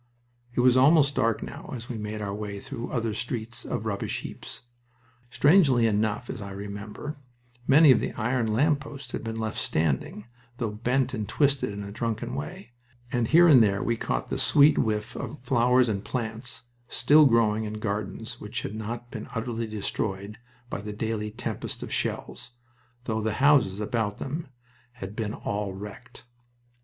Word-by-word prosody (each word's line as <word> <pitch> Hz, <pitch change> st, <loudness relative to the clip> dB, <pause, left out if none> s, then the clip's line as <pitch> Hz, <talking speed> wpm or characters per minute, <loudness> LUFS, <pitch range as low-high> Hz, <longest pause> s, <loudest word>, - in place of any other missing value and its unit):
It -, -, +3 dB
was 125 Hz, 0 st, +5 dB
almost 145 Hz, +1 st, +6 dB
dark 115 Hz, -4 st, +1 dB
now -, -, -8 dB
as 120 Hz, 0 st, -7 dB
we 125 Hz, -, -5 dB
made 105 Hz, 0 st, -4 dB
our 100 Hz, -1 st, -3 dB
way 100 Hz, -1 st, -5 dB
through 115 Hz, -, -6 dB
other 115 Hz, -3 st, -1 dB
streets 115 Hz, +1 st, -4 dB
of -, -, -3 dB
rubbish -, -, -2 dB
heaps. -, -, -8 dB, 0.7 s
Strangely 140 Hz, -5 st, +5 dB
enough, 110 Hz, +1 st, +1 dB
as 115 Hz, -, -5 dB
I 100 Hz, -, -6 dB
remember, 100 Hz, +8 st, -6 dB, 0.5 s
many 145 Hz, +1 st, +8 dB
of 125 Hz, -, +5 dB
the -, -, -2 dB
iron 120 Hz, 0 st, 0 dB
lamp 145 Hz, +6 st, +3 dB
posts 140 Hz, -3 st, -9 dB
had -, -, -4 dB
been 115 Hz, 0 st, -4 dB
left 110 Hz, -1 st, -2 dB
standing, 80 Hz, -, -1 dB, 0.3 s
though 115 Hz, -3 st, -2 dB
bent 125 Hz, +5 st, 0 dB
and 110 Hz, -4 st, -3 dB
twisted 140 Hz, -4 st, +2 dB
in 100 Hz, 0 st, -5 dB
a 100 Hz, -, -7 dB
drunken 115 Hz, +1 st, -3 dB
way, 75 Hz, -, -6 dB, 0.4 s
and 120 Hz, -2 st, +1 dB
here 170 Hz, +5 st, +7 dB
and 140 Hz, -7 st, +8 dB
there 100 Hz, -2 st, +2 dB
we 115 Hz, -, +1 dB
caught -, -, -2 dB
the -, -, -2 dB
sweet 145 Hz, +1 st, +5 dB
whiff 105 Hz, -1 st, -1 dB
of -, -, -5 dB
flowers 125 Hz, 0 st, +4 dB
and 100 Hz, -3 st, -1 dB
plants 120 Hz, 0 st, -3 dB, 0.2 s
still 145 Hz, +5 st, +5 dB
growing 110 Hz, -3 st, +3 dB
in 105 Hz, -, -4 dB
gardens 110 Hz, +3 st, -4 dB
which 105 Hz, 0 st, -4 dB
had 100 Hz, -, -4 dB
not 115 Hz, +3 st, -5 dB
been 110 Hz, -, -7 dB
utterly 115 Hz, 0 st, -2 dB
destroyed 105 Hz, -1 st, -3 dB, 0.3 s
by -, -, -3 dB
the 105 Hz, 0 st, -6 dB
daily 110 Hz, 0 st, -2 dB
tempest 105 Hz, -, -4 dB
of -, -, -6 dB
shells, 125 Hz, 0 st, -3 dB, 0.5 s
though 110 Hz, -3 st, -1 dB
the 110 Hz, 0 st, 0 dB
houses 135 Hz, -7 st, +4 dB
about 105 Hz, -1 st, -1 dB
them 150 Hz, +4 st, -4 dB, 0.5 s
had 100 Hz, -4 st, -8 dB
been 110 Hz, -2 st, -2 dB
all 100 Hz, -1 st, -3 dB
wrecked. 105 Hz, +4 st, -10 dB
115 Hz, 170 wpm, -27 LUFS, 105-125 Hz, 0.7 s, many